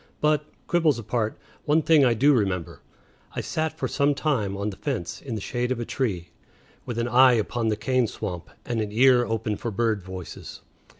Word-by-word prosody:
But, 150 -1 +2 0.2
quibbles 165 -6 +2
apart, 115 -1 -2 0.3
one 155 +2 +3
thing 155 -2 +5
I 120 -3 +4
do 140 +6 +5
remember: 95 - -1 0.5
I - - -1
sat 160 0 -2
for - - -1
some 145 0 +1
time 120 -10 -1
on 100 +1 -2
the - - -9
fence, 115 - -4
in 125 -5 -5
the - - -3
shade 125 +4 -2
of 125 - -1
a 120 - -3
tree, 95 -12 -2 0.6
with 120 - -4
an 120 0 0
eye 125 +1 +6
upon 115 +1 0
the 105 -1 +1
cane 125 +2 +1
swamp 90 -4 -6 0.2
and 120 -2 -1
an 105 -1 -3
ear 125 +2 +5
open 110 -2 -2
for 120 - -4
bird 110 -1 0
voices. 95 -1 -9
120 Hz, 195 wpm, -25 LUFS, 105-135 Hz, 0.6 s, eye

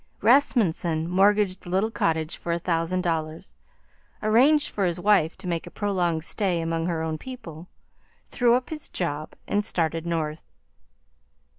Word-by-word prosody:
Rasmunsen 180 - +2
mortgaged 195 +1 +3
the - - -10
little 195 +5 +1
cottage 160 -6 -1
for 170 - -5
a 170 - +1
thousand 170 +1 -1
dollars, 160 0 -3 0.7
arranged 270 +8 +4
for 200 - -1
his 175 -1 -1
wife 190 -4 +3
to - - -12
make 170 -2 -2
a - - -6
prolonged 175 -6 -1
stay 185 -1 -1
among 165 0 -1
her 165 -2 -1
own 160 -1 -3
people, 180 -11 -9 0.6
threw 240 -1 +3
up 250 +3 -2
his 305 -1 -6
job, 155 -3 -4
and 205 +1 +1
started 165 -3 -1
North. 160 -2 -2
175 Hz, 150 wpm, -25 LUFS, 165-205 Hz, 0.7 s, arranged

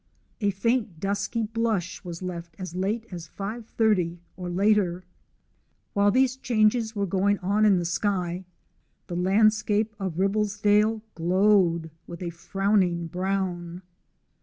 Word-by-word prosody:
A 205 -3 +1
faint 210 -2 0
dusky 205 +4 -1
blush 220 -5 -2
was 175 0 -7
left 170 -2 -6
as 185 -4 -6
late 205 +5 -1
as 170 -3 -7
5.30, 210 -4 0 0.2
or 180 -1 -6
later. 185 -1 +2 0.9
While 200 0 +4
these 255 +3 +3
changes 220 -2 +1
were 200 -1 0
going 200 +2 +1
on 200 +4 +1
in 200 -3 +5
the 175 - -1
sky, 180 0 -1 0.6
the 175 - -6
landscape 210 +3 +2
of 190 -4 -3
Ribblesdale 210 +2 +2
glowed 175 -2 +2 0.2
with 170 +1 -7
a 170 - -3
frowning 185 -1 0
brown. 180 -1 -3
195 Hz, 125 wpm, -26 LUFS, 175-215 Hz, 0.9 s, in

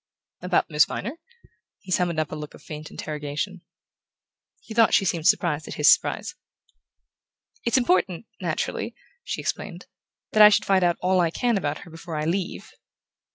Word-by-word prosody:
"About 180 -1 +1
Miss 150 -1 +4
Viner?" 235 - -5 0.6
He 190 - -12
summoned 175 -3 +1
up 155 -2 -2
a - - -4
look 150 -1 -8
of - - -17
faint 155 0 -8
interrogation. 150 +5 -5 1.0
He 220 - -10
thought 225 0 +5
she 205 -5 +3
seemed 165 -3 0
surprised 155 -2 +2
at - - -6
his - - +7
surprise. - - -2 1.3
"It's 235 +2 +3
important, 185 -5 +1
naturally," - - -3 0.3
she - - -4
explained, - - -4 0.5
"that 215 - +4
I 210 - +11
should 205 - +2
find 190 -2 +3
out 175 -1 +2
all 185 0 +2
I 170 -2 +3
can 240 +7 0
about 150 -7 -2
her 170 - -14
before 165 0 -8
I 150 0 -2
leave." 180 +2 -3
175 Hz, 165 wpm, -25 LUFS, 155-195 Hz, 1.3 s, I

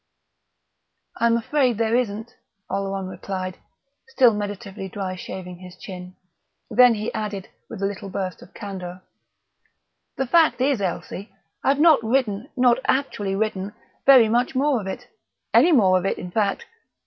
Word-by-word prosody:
"I'm 235 0 +3
afraid 250 -1 +1
there 225 0 +1
isn't," 225 -2 -2 0.4
Oleron 195 0 -2
replied, 185 -1 -5 0.5
still 255 -3 +4
meditatively 205 -1 -5
dry 190 -1 -4
shaving 180 -1 -7
his 180 0 -12
chin. 180 -1 -9 0.6
Then 250 -2 +6
he 215 +1 -4
added, 205 -3 -4 0.2
with 200 -3 -6
a - - +3
little 200 0 -4
burst 185 -1 -4
of - - -14
candour, 185 -2 -7 1.1
"The 270 - 0
fact 320 +4 +4
is, 260 -3 +1
Elsie, 190 +2 -4 0.3
I've 275 +1 +2
not 310 -6 +6
written 230 0 0
not 250 -1 +4
actually 205 -8 0
written 200 -1 -2 0.3
very 260 -5 +8
much 240 +4 +1
more 270 -2 +2
of 195 - -7
it 245 +6 -6 0.5
any 350 - +6
more 190 - +5
of 180 - -5
it, - - -1
in 180 - -7
fact. 200 -1 0
210 Hz, 150 wpm, -23 LUFS, 190-245 Hz, 1.1 s, very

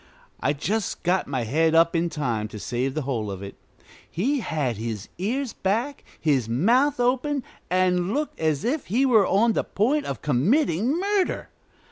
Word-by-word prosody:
I 140 - +1
just 200 +9 -2
got 180 +1 +1
my 130 -3 -2
head 160 +8 +2
up 165 +1 +4
in 170 +1 +1
time 120 -9 -2
to 105 - -9
save 125 +4 -2
the 155 - -1
whole 120 -6 -2
of 95 0 -6
it. 100 - -7 0.6
He 265 - 0
had 145 - -2
his 110 -2 -5
ears 245 +7 -2
back, 235 +9 -1 0.2
his 135 -8 +1
mouth 245 - +3
open, 260 +3 +1 0.3
and 180 0 +2
looked 295 +5 -2
as 155 -3 0
if 275 +6 -1
he 245 +8 +2
were 220 -7 +5
on 225 +4 +3
the - - 0
point 280 +9 0
of - - -5
committing 210 - +2
murder. 395 -1 0
180 Hz, 170 wpm, -24 LUFS, -, 0.6 s, were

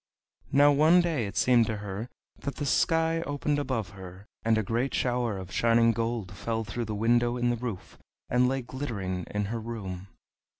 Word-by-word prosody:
Now 145 +2 +6
one 155 +5 +5
day 160 -11 0
it 105 +2 -7
seemed 115 0 +4
to 110 - -2
her 105 +3 -5 0.3
that 140 - -4
the 145 - -3
sky 165 +4 +2
opened 145 -1 -1
above 115 -9 -2
her, 95 -1 -11 0.2
and 115 -1 +3
a 110 - +1
great 120 +7 -1
shower 120 -4 0
of 95 -1 -8
shining 115 +2 +4
gold 115 -3 -2
fell 115 -1 -2
through 115 +3 -4
the 105 -1 -4
window 120 +3 +2
in 120 0 +1
the - - 0
roof, 115 -5 -6 0.3
and 125 +1 +3
lay 135 -1 -1
glittering 110 -8 -4
in 105 0 -1
her 115 - -2
room. 100 -5 -6
115 Hz, 185 wpm, -28 LUFS, 105-130 Hz, 0.3 s, Now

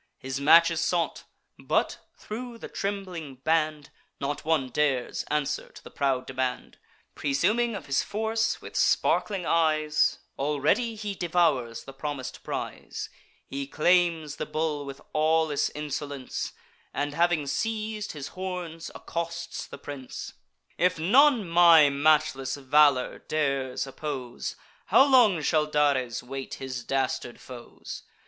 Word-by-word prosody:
His 135 +1 -5
match 170 +4 +7
is 165 -1 -1
sought; 170 0 -1 0.3
but, - - 0 0.2
thro' 235 +2 -7
the - - -8
trembling 185 -8 -4
band, 155 +1 0 0.3
Not 145 +2 -3
one 155 -5 +1
dares 130 -2 0
answer 150 -1 -1
to - - -14
the - - -12
proud 135 -2 0
demand. 130 -1 -3 0.3
Presuming 215 +12 +1
of 200 - -6
his 140 0 +1
force, 220 +2 -1
with - - -10
sparkling 195 -4 +2
eyes 155 -2 +2 0.2
Already 150 - +1
he 210 -1 -4
devours 165 -10 +1
the 135 - -10
promis'd 135 -1 -5
prize. - - -5 0.4
He 140 0 -5
claims 165 -1 +2
the - - -4
bull 150 -1 -2
with 140 0 -8
awless 155 -1 +2
insolence, 145 -2 -4 0.4
And 145 +1 -1
having 170 -1 +2
seiz'd 215 +5 -2
his 145 -2 -6
horns, 180 -3 -5
accosts 170 0 -5
the - - -9
prince: 135 -3 -8 0.5
"If 180 0 +3
none 235 - +5
my 165 -3 +7
matchless 145 -2 +2
valour 140 -1 +3
dares 140 -4 -1
oppose, 135 -3 -5 0.3
How 270 - +6
long 225 - +5
shall 155 0 +2
Dares 140 -6 +1
wait 135 +1 -6
his 130 -2 -5
dastard 130 -2 -2
foes? 120 -2 -9
150 Hz, 125 wpm, -27 LUFS, 140-175 Hz, 0.5 s, match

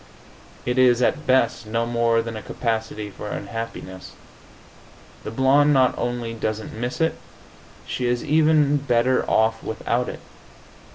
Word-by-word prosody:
It 125 +1 0
is, 125 -1 +5
at 150 +4 0
best, 120 -3 +2
no 115 +2 0
more 115 -1 +1
than 115 -1 -6
a 110 - -6
capacity 110 -3 -3
for 105 - -8
unhappiness. 105 -3 -6 1.1
The - - -5
blonde 135 +5 +4
not 130 -2 +3
only 120 -1 -3
doesn't 110 -1 -4
miss 120 +3 -4
it; 160 0 0 0.7
she 125 - -2
is 120 0 0
even 155 -1 +3
better 130 -2 +1
off 110 0 +2
without 120 +2 -2
it. - - -8
120 Hz, 135 wpm, -23 LUFS, 115-130 Hz, 1.1 s, is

